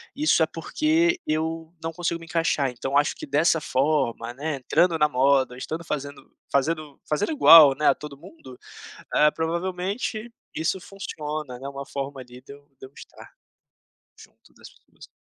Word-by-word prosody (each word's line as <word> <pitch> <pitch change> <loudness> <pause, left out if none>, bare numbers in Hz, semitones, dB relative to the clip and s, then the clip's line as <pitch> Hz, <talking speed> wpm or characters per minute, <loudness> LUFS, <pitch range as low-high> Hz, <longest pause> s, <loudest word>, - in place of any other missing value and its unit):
isso 290 - +3
é - - +4
porque 315 - 0
eu 160 +1 -3
não 165 - -3
consigo 170 0 -3
me 165 - -12
encaixar 165 -5 0
então 130 +3 -5
acho 145 +1 +2
que - - -8
dessa 155 +4 +2
forma, 135 -5 -1
né, 145 +2 -3
entrando 165 +6 +2
na 150 0 +4
moda, 130 -1 +2
estando 160 +6 -5
fazendo 145 -3 -6 0.2
fazendo 150 +1 -1
fazendo 180 - 0
igual, 155 - +8
né, 150 +2 0
a - - +5
todo 150 -2 -9
mundo, 150 -6 -14 0.6
eh, 150 0 +5
provavelmente 185 +8 -3 0.2
isso 160 +4 -2
funciona, 155 -8 -6
né, 135 - -8
é - - -4
uma 140 0 -7
forma 140 -1 -5
ali 125 0 -12
de 140 - -12
eu 145 0 -16
de - - -9
eu 130 - -20
estar, - - -14 0.9
junto - - -19
das - - -14
pessoas". - - -19
150 Hz, 170 wpm, -24 LUFS, 140-165 Hz, 0.9 s, igual